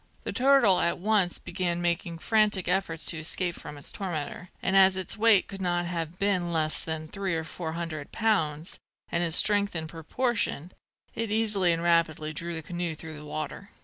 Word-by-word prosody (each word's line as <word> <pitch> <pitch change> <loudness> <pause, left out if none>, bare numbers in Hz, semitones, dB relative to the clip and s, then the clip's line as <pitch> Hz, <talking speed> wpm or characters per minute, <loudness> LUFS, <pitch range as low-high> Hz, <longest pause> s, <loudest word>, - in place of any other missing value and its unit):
The - - -4
turtle 260 -7 +4
at 170 - +1
once 195 -2 +1
began 175 -1 -2
making 170 -1 -1
frantic 210 0 +2
efforts 165 -4 0
to 165 - +1
escape 175 +2 +1
from 150 - -10
its 145 - -4
tormentor; 180 -2 -5
and 190 - 0
as 190 -1 +6
its 190 - -4
weight 220 -3 +5
could 195 -1 -8
not 175 -1 0
have 170 -1 -4
been 185 -3 0
less 155 -2 +1
than 160 -1 -4
three 190 0 -2
or 160 - -1
four 160 0 -6
hundred 160 -3 -5
pounds, 170 -8 -1 0.3
and 170 - +1
its 165 -1 +1
strength 205 -2 +4
in 160 -1 -2
proportion, 175 - -2 0.4
it 225 -1 -3
easily 210 -4 +2
and 165 0 -1
rapidly 160 -2 +1
drew 170 +3 -4
the 160 - -5
canoe 175 0 -3
through 160 +1 -8
the 150 0 -10
water. 155 +7 -6
175 Hz, 185 wpm, -27 LUFS, 160-195 Hz, 0.4 s, as